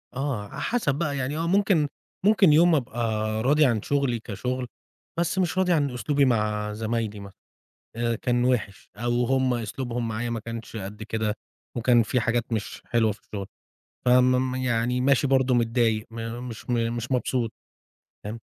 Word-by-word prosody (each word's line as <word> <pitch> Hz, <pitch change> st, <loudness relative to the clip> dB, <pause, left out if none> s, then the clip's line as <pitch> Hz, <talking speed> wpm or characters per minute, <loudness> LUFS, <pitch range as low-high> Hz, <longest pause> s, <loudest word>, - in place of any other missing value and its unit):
آه، 130 Hz, -6 st, -2 dB
على -, -, -7 dB
حسب 225 Hz, -, 0 dB
بقى، 145 Hz, -2 st, -1 dB
يعني 135 Hz, +3 st, -2 dB
هو 165 Hz, +1 st, -1 dB
ممكن 190 Hz, -4 st, +3 dB, 0.4 s
ممكن 200 Hz, -6 st, +6 dB
يوم 170 Hz, +2 st, +6 dB
أبقى 125 Hz, -4 st, -2 dB, 0.4 s
راضي 150 Hz, +4 st, +4 dB
عن 115 Hz, -5 st, +2 dB
شغلي 140 Hz, -2 st, 0 dB
كشغل، 125 Hz, +4 st, -4 dB, 0.5 s
بس 175 Hz, +4 st, 0 dB
مش 185 Hz, 0 st, 0 dB
راضي 185 Hz, -1 st, +3 dB
عن 145 Hz, -4 st, +1 dB
أسلوبي 140 Hz, +4 st, +1 dB
مع 105 Hz, -3 st, 0 dB
زمايلي 110 Hz, -1 st, -2 dB
مث 100 Hz, -1 st, -10 dB, 0.6 s
آآ 115 Hz, 0 st, 0 dB
كان 120 Hz, +1 st, 0 dB
وِحش، 110 Hz, -6 st, -1 dB
أو 120 Hz, +2 st, +1 dB
هُم 130 Hz, 0 st, +2 dB
أسلوبهم 120 Hz, +1 st, -3 dB
معايا 115 Hz, +2 st, -2 dB
ما 115 Hz, -1 st, -2 dB
كانش 115 Hz, +1 st, -7 dB
قد 105 Hz, +1 st, -6 dB
كده 110 Hz, -1 st, -2 dB, 0.4 s
وكان 120 Hz, 0 st, +4 dB
فيه 125 Hz, +4 st, 0 dB
حاجات 120 Hz, 0 st, 0 dB
مش 110 Hz, -2 st, -4 dB
حلوة 115 Hz, -3 st, +2 dB
في 105 Hz, -, -9 dB
الشغل. 100 Hz, -2 st, -6 dB, 0.6 s
فمم 125 Hz, +1 st, +4 dB
يعني 125 Hz, -1 st, 0 dB
ماشي 140 Hz, +2 st, +3 dB
برضو 130 Hz, -1 st, +3 dB
متضايق، 115 Hz, -2 st, +1 dB
م 115 Hz, +1 st, -5 dB
مش 115 Hz, +1 st, -9 dB
م -, -, +2 dB, 0.2 s
مش 120 Hz, +3 st, -5 dB
مبسوط، 125 Hz, -2 st, 0 dB, 0.7 s
تمام. 110 Hz, +3 st, -5 dB
120 Hz, 165 wpm, -25 LUFS, 115-135 Hz, 0.7 s, ممكن